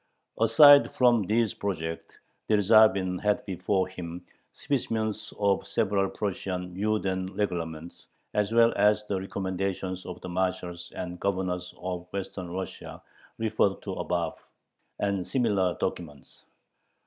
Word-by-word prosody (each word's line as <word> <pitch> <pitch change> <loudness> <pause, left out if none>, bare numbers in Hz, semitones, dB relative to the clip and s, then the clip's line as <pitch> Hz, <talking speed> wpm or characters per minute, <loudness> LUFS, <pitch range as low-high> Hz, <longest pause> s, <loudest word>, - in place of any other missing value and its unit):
Aside 140 +6 +7
from 120 -6 +4
these 110 -2 +2
projects, 80 -4 -4 0.3
Dyerzhavin 100 -3 +4
had 105 -1 +1
before 95 0 0
him 90 -2 -8 0.3
specimens 110 -6 -2
of 100 -2 +1
several 100 -3 +1
Prussian 90 -3 -4
Juden 95 -2 -1
Reglements, 85 -4 -4 0.3
as 105 0 0
well 115 0 +5
as 105 +1 +4
the 100 -3 -3
recommendations 95 -1 -3
of 90 -1 -7
the - - -7
marshals 90 -1 -3
and 90 -1 -5
governors 90 -2 -2
of 90 -1 -5
Western 95 -2 -5
Russia 95 +2 -6 0.4
referred 110 -3 +1
to 95 - -4
above, 85 -3 -3 0.5
and 100 -3 -1
similar 100 -9 +1
documents. 75 -6 -5
95 Hz, 115 wpm, -27 LUFS, 90-105 Hz, 0.5 s, Aside